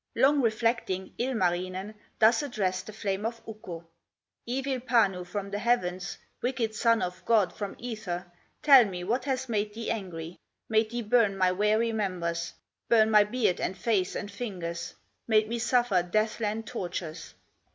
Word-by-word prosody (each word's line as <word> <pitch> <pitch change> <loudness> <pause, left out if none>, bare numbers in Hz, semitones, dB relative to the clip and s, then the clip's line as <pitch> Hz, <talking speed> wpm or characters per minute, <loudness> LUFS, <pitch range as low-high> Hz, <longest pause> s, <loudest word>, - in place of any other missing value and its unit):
Long 275 +4 +4
reflecting, 225 -5 0
Ilmarinen 185 -4 -1 0.2
Thus 225 +3 +5
addressed 190 -9 -2
the - - -6
flame 200 -2 -3
of 230 +1 -3
Ukko: 175 -7 -8 0.6
"Evil 265 +1 -1
Panu 225 -7 +2
from 200 +1 -4
the 205 - -2
heavens, 185 -6 0 0.2
Wicked 245 -3 -1
son 230 +1 +2
of 180 0 -5
God 210 -6 +3
from 200 -2 -5
ether, 205 -7 -5 0.4
Tell 275 -4 +9
me 180 -3 -5
what 240 +7 -1
has 260 -2 -1
made 210 -2 -1
thee 230 0 -3
angry, 175 -5 -5 0.3
Made 220 0 +2
thee 240 +1 -3
burn 215 -3 +3
my 185 -1 +3
weary 210 +4 +2
members, 175 -6 -2 0.3
Burn 220 -1 +5
my 210 -1 +7
beard, 210 -4 0
and 190 - -2
face, 190 -2 0
and 205 - -4
fingers, 180 -6 -5 0.3
Made 215 -1 +4
me 235 +1 -2
suffer 240 -5 +2
death 215 +6 0
land 220 0 -2
tortures?" 175 -7 -5
215 Hz, 155 wpm, -28 LUFS, 185-235 Hz, 0.6 s, Tell